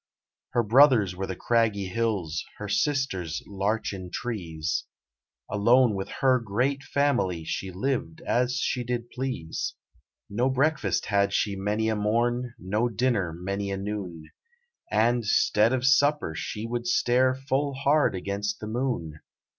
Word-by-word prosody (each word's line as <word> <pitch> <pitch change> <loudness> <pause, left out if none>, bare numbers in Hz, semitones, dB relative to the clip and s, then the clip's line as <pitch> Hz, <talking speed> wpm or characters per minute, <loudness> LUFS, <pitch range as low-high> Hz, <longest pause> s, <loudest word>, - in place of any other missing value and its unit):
Her 120 - +3
Brothers 115 -5 +5
were 95 +1 -3
the 95 - -4
craggy 115 -3 +1
hills, 95 -6 -1
Her 105 - -6
Sisters 105 - -1
larchen 100 -2 -2
trees 85 - -3 0.6
Alone 115 +3 +4
with 95 -1 -4
her 130 -1 +4
great 125 +6 -1
family 135 - 0
She 95 +4 -3
liv'd 95 -4 -2
as 125 +1 +1
she 125 - -1
did 120 0 -3
please. 125 -11 -4 0.5
No 120 +6 0
breakfast 130 - +1
had 100 -1 +1
she 100 -1 +1
many 105 +3 -1
a 110 - +1
morn, 120 +3 0
No 105 +6 0
dinner 115 -6 0
many 100 +4 -4
a 100 - -2
noon, 95 -6 -5 0.6
And 115 +3 +2
'stead 105 +1 +3
of 130 -1 0
supper 145 - +3
she 105 +6 -4
would 120 +1 -3
stare 125 +2 +3
Full 135 +1 -1
hard 140 -3 +2
against 100 +2 -3
the - - -6
Moon. 110 - -3
110 Hz, 140 wpm, -26 LUFS, 95-125 Hz, 0.6 s, Brothers